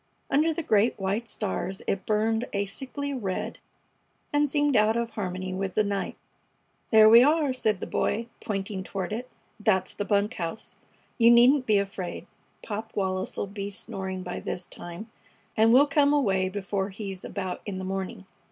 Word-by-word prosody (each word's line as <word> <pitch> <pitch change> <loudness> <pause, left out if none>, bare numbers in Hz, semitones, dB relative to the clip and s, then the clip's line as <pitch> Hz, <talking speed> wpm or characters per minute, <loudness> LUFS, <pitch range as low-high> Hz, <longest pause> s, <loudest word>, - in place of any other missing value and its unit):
Under 310 +3 +3
the 320 +1 -3
great 220 -2 +3
white 200 +4 -1
stars 195 -2 -3
it 195 -1 -2
burned 220 +3 +1
a 200 0 0
sickly 275 +7 -5
red 200 -8 -3 0.7
and 290 0 +3
seemed 290 -1 +2
out 215 +1 +4
of 235 -1 -2
harmony 185 -3 -4
with 190 0 -3
the 215 - +4
night. 200 -1 -3 0.7
"There 220 -1 +8
we 230 +2 +9
are!" 295 0 +3
said 220 -6 0
the - - -2
Boy, 225 +3 -1 0.2
pointing 195 -2 -3
toward 190 +1 -4
it. 245 +3 -5 0.3
"That's 190 -3 +1
the 205 - -3
bunk 205 0 +1
house. 170 +4 -5 0.4
You 230 0 +7
needn't 250 +3 +6
be 215 -2 +4
afraid. 195 -2 -3 0.4
Pop 220 +1 -5
Wallis 190 -1 -1
'll - - -1
be 200 0 -5
snoring 190 -2 -5
by 180 - -5
this 180 - -4
time, 175 +6 -9 0.4
and 220 +1 +5
we'll 265 +4 +7
come 285 0 +3
away 195 -10 +2
before 195 0 -2
he's 195 -2 -6
about 185 -3 -4
in 195 -2 -3
the 190 - -4
morning. 195 0 -4
205 Hz, 170 wpm, -27 LUFS, 190-235 Hz, 0.7 s, we